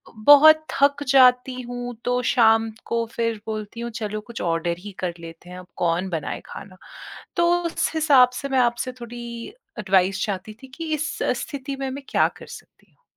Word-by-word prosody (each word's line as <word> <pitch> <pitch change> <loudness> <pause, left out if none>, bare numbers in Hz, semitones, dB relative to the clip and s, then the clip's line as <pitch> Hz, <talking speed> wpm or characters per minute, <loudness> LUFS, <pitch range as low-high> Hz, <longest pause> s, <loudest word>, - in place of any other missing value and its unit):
बहुत 295 +7 +7
थक 285 +1 +3
जाती 255 -1 +4
हूँ, 245 0 -6
तो 245 0 +1
शाम 225 -2 +4
को 230 0 -1
फिर 230 -2 -1
बोलती 215 +1 -5
हूँ, 235 0 -4
"चलो, 215 -1 -4
कुछ 235 +2 -9
ऑर्डर 170 0 -1
ही 205 +3 -9
कर 180 -2 -2
लेते 165 +1 -12
हैं, 180 - -9
अब 180 - -13
कौन 175 +2 0
बनाए 165 -4 -4
खाना।" 195 -2 -11 0.6
तो 345 0 +3
उस 335 - -1
हिसाब 280 -5 +5
से 275 - -5
मैं 265 - +2
आपसे 240 +1 0
थोड़ी 235 0 -8 0.3
एडवाइस 190 -1 +2
चाहती 200 0 -5
थी - - -9
कि 325 -1 -4
इस 310 +1 -3 0.2
स्थिति 280 -1 -6
में 270 -1 -3
मैं 275 +2 -7
क्या - - +3
कर - - -11
सकती - - -14
हूँ? - - -38
235 Hz, 180 wpm, -23 LUFS, 200-265 Hz, 0.6 s, बहुत